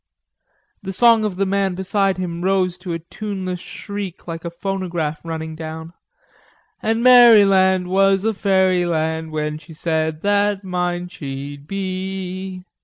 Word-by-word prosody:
The 195 -1 -5
song 230 +1 +5
of 210 -4 -2
the 195 +2 0
man 195 -1 0
beside 190 +1 0
him 175 -2 -4
rose 185 -2 +1
to 180 -2 -5
a - - -1
tuneless 185 +1 -5
shriek, 200 -1 -7
like 165 -1 -6
a 170 - -3
phonograph 170 -4 -3
running 160 -1 -5
down: 160 +1 -7 0.9
"An' 225 +1 0
Mary 240 -4 +8
land 190 -2 +3
was 195 +1 +3
fairy 190 -2 +2
land 160 -1 -1
When 150 0 -3
she 160 +1 -14
said 160 -1 -1
that 205 0 +1
mine 180 -1 -2
she'd 140 -1 -7
be..." 190 -1 -4
185 Hz, 140 wpm, -20 LUFS, 165-195 Hz, 0.9 s, Mary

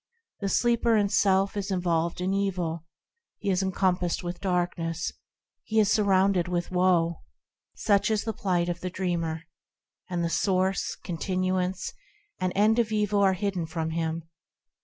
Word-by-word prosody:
The 200 - -2
sleeper 235 +1 +3
in 205 -1 +2
self 195 0 +2
is 200 0 -3
involved 170 -2 0
in 185 +2 0
evil; 175 -5 -2 0.5
He 200 - -1
is 185 0 +1
encompassed 185 -2 0
with 175 0 -5
darkness; 175 -3 -1 0.5
He 220 0 +1
is 210 -1 +4
surrounded 195 -3 +3
with 175 0 -2
woe; 180 -2 +2 0.5
Such 205 +1 +2
is 215 -1 +1
the 220 - -2
plight 180 -4 0
of 175 -1 -2
the 185 - -4
dreamer, 170 -3 -2 0.7
And 175 -2 -1
the 170 - 0
source, 190 0 +1
continuance, 185 +1 -1 0.5
and 185 -1 0
end 215 +3 +4
of 230 -2 +1
evil 210 -1 +1
are 195 -1 +4
hidden 185 -3 -2
from 160 0 -3
him. 165 0 -2
185 Hz, 150 wpm, -27 LUFS, 175-200 Hz, 0.7 s, is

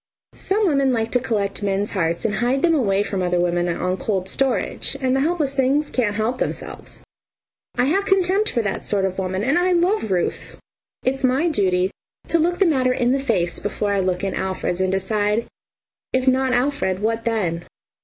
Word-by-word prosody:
Some 415 +2 0
women 275 -4 +2
like 225 -2 -1
to 250 - +2
collect 210 -5 -2
men's 200 0 -1
hearts 170 -3 -1
and 210 - +1
hide 245 +5 0
them 340 -1 +4
away 205 -9 +2
from 195 -2 -3
other 180 -1 +1
women 175 0 +1
on 180 +2 -1
cold 190 -3 -2
storage, 270 +4 -1
and 260 -1 +1
the - - +2
helpless 300 -2 0
things 275 +2 +1
can't 210 -5 0
help 225 +4 -1
themselves. - - -5 0.7
I 250 - +3
have 390 +8 +1
contempt 385 +2 +2
for 235 - -1
that 205 - -3
sort 200 -2 0
of 190 0 -3
a - - +1
woman, 185 +1 -2
and 275 +9 +2
I 365 +1 +2
love 350 - +1
Ruth! 180 -2 -2 0.5
It's 270 +1 -1
my 265 +7 +2
duty 185 - +1 0.4
to 335 - +2
look 350 +2 +1
the 390 - +3
matter 260 -6 +2
in 245 0 +1
the 275 - +2
face 190 -10 0
before 205 0 -2
I 200 - +1
look 185 0 -1
in 195 - -1
Alfred's 190 -1 -2
and 185 0 +1
decide. 210 +3 0 0.7
If 260 0 +1
not 260 0 +3
Alfred, 250 -6 0
what 225 +3 -1
then? 180 -7 -1
230 Hz, 195 wpm, -21 LUFS, 190-275 Hz, 0.7 s, them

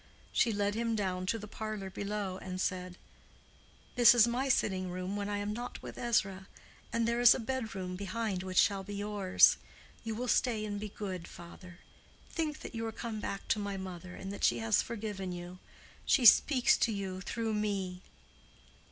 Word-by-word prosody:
She 235 - +3
led 205 -1 0
him 230 +1 -1
down 185 -3 -2
to 225 - +1
the 210 -1 -8
parlor 215 -3 -5
below, 200 -2 -3
and 185 -1 -6
said, 185 -1 -2 1.0
"This 245 -1 +7
is 235 -1 +6
my 255 +3 -1
sitting 185 -7 +1
room 185 +2 -4
when 205 0 -3
I 205 - -1
am 205 +1 -2
not 240 +2 -6
with - - -8
Ezra, 195 -5 0 0.4
and 230 0 +1
there 235 0 +1
is 245 0 +8
a - - -3
bedroom 220 -7 -4
behind 200 0 -2
which 185 0 -5
shall 200 -1 +4
be 205 +1 -7
yours. 205 -2 +4 0.5
You 225 -1 -3
will 250 +3 -3
stay 230 -4 +1
and 205 -1 -4
be 210 0 -5
good, 190 -4 -6
father. 175 +1 -12 0.5
Think 310 -2 -2
that - - -8
you 230 -1 -4
are - - -3
come 225 0 -5
back 200 -1 -5
to - - +2
my 200 -1 -3
mother, 185 -1 -7
and 195 +1 -6
that - - -8
she 120 - +4
has 115 -1 +2
forgiven 205 -5 -5
you—she 180 +7 -3
speaks 250 +3 +7
to 230 - +2
you 190 -2 -4
through 225 +2 -2
me." 195 -4 -2
205 Hz, 185 wpm, -32 LUFS, 185-225 Hz, 1.0 s, is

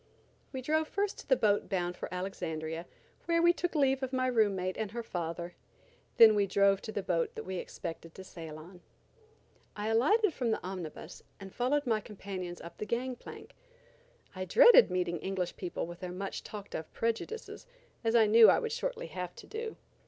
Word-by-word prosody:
We 260 -2 -5
drove 315 +3 +1
first 400 +3 -2
to - - -11
the - - +5
boat 205 - +1
bound 180 -3 -1
for - - -7
Alexandria, 165 -3 -4 0.4
where 335 0 +2
we 345 +1 +5
took 350 -1 -3
leave 270 -2 +3
of 260 -1 -3
my 255 -1 0
room 220 -6 +3
mate, 185 0 -2
and 220 -2 -3
her 235 0 -4
father. 170 -2 -4 0.6
Then 225 -2 +9
we 205 -1 +2
drove 195 0 +3
to 220 - -6
the 205 - -3
boat 170 -3 0
that - - -5
we 185 0 -4
expected 165 -1 -7
to 190 - -9
sail 165 -4 -9
on. 175 +3 -13 0.9
I 210 +1 -3
alighted 330 - +3
from 250 -4 -1
the 220 - -1
omnibus, 180 -4 -7 0.2
and 195 -1 -10
followed 280 +4 +1
my 225 -3 +2
companions 190 -4 -7
up 170 0 -11
the - - -3
gang 250 +3 -2
plank. - - -11 0.8
I 185 - -3
dreaded - - +7
meeting 175 -2 -1
English 185 -1 -3
people 180 -2 -4
with 175 +1 -9
their 180 -1 -5
much 195 +2 -5
talked 205 -2 -9
of 160 - -5
prejudices, 230 - -3 0.4
as 225 0 +1
I 225 -2 +7
knew 220 +1 +8
I - - +5
would 460 -2 -2
shortly - - -3
have 180 -1 -6
to - - -11
do. 445 0 -6
205 Hz, 195 wpm, -31 LUFS, 180-260 Hz, 0.9 s, Then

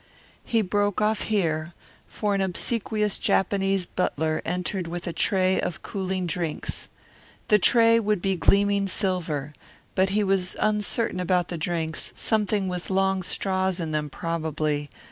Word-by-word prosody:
He 225 -2 +1
broke 205 +1 0
off 215 +1 +1
here, 170 -6 0 0.3
for 210 -1 -1
an 195 - +1
obsequious 210 +2 -1
Japanese 195 -1 +1
butler 160 -3 -1
entered 180 0 -2
with 175 +1 -5
a 170 - -3
tray 190 -1 +2
of 175 - -4
cooling 190 -2 -2
drinks. 170 -2 -3 0.6
The 210 - +6
tray 230 +2 +5
would 210 -2 +1
be 195 +2 0
gleaming 200 +2 +3
silver, 170 -8 -1 0.4
but 190 0 +2
he 210 +2 +2
was 190 -2 0
uncertain 210 -1 0
about 180 -1 +1
the 170 - -3
drinks; 160 -1 -3
something 210 -2 +1
with 180 -1 -4
long 190 0 +2
straws 190 0 -1
in 165 -2 -3
them, 150 -1 -1
probably. 155 -2 -2
190 Hz, 145 wpm, -25 LUFS, 170-205 Hz, 0.6 s, The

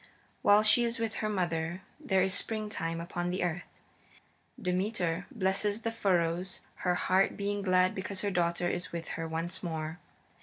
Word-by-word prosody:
While 205 +1 +6
she 230 +3 +6
is 235 0 0
with 225 -1 -1
her 215 - -1
mother 175 -2 -1 0.2
there 190 -1 +2
is 190 0 +2
springtime 210 -7 -1
upon 175 +1 -3
the 180 +1 -1
earth. 175 0 -2 0.9
Demeter 180 -2 -1
blesses 200 +3 +1
the 230 - 0
furrows, 180 -4 0 0.2
her 180 -1 +1
heart 190 +2 +2
being 205 0 -1
glad 185 -1 +3
because 190 0 -3
her 205 - 0
daughter 175 -1 +1
is 175 0 -2
with 170 -1 -5
her 165 0 -3
once 165 +2 -3
more. 160 -1 -4
185 Hz, 160 wpm, -31 LUFS, 170-205 Hz, 0.9 s, While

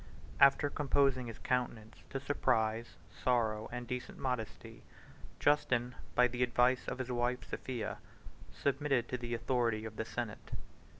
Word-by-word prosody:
After 140 +1 +6
composing 135 -3 +2
his 115 - -7
countenance 120 -3 -2
to 135 - -3
surprise, 115 -5 0 0.3
sorrow, 110 -4 +1
and 125 0 -4
decent 125 +1 -5
modesty, 125 -5 -4 0.6
Justin, 125 -4 +2 0.2
by 125 0 +6
the 125 +1 -4
advice 125 +1 +3
of - - -2
his 130 -1 -3
wife 120 +1 0
Sophia, 120 -5 -4 0.5
submitted 140 -3 +1
to 125 - -1
the 120 -1 -2
authority 115 -2 0
of 110 -1 -7
the 110 - -2
senate. 115 -2 -5
125 Hz, 135 wpm, -34 LUFS, 115-130 Hz, 0.6 s, After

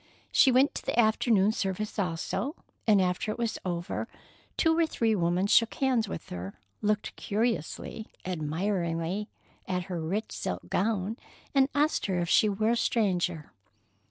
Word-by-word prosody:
She 265 - +6
went 260 +3 +4
to - - -5
the - - -2
afternoon 220 -2 +4
service 210 +1 -3
also, 185 - -2 0.3
and 210 -3 +6
after 180 +3 0
it - - -5
was 235 -2 -2
over 175 +4 -3 0.5
two 325 -1 +3
or 330 -1 +3
three 225 -7 +1
women 175 -1 +1
shook 230 +3 +4
hands 255 -5 +1
with 165 - -6
her, 90 +2 -6 0.3
looked 210 0 0
curiously, 220 0 -2 0.2
admiringly 175 +3 -2 0.4
at 180 -1 -1
her 175 -2 -4
rich 195 +8 -2
silk 90 0 -4
gown, 210 +1 0 0.4
and 270 -1 +4
asked 295 -3 +2
her 190 -2 0
if 170 -1 -1
she 215 - +5
were 215 +3 +1
a - - +3
stranger. 180 -9 0
205 Hz, 155 wpm, -29 LUFS, 175-225 Hz, 0.5 s, She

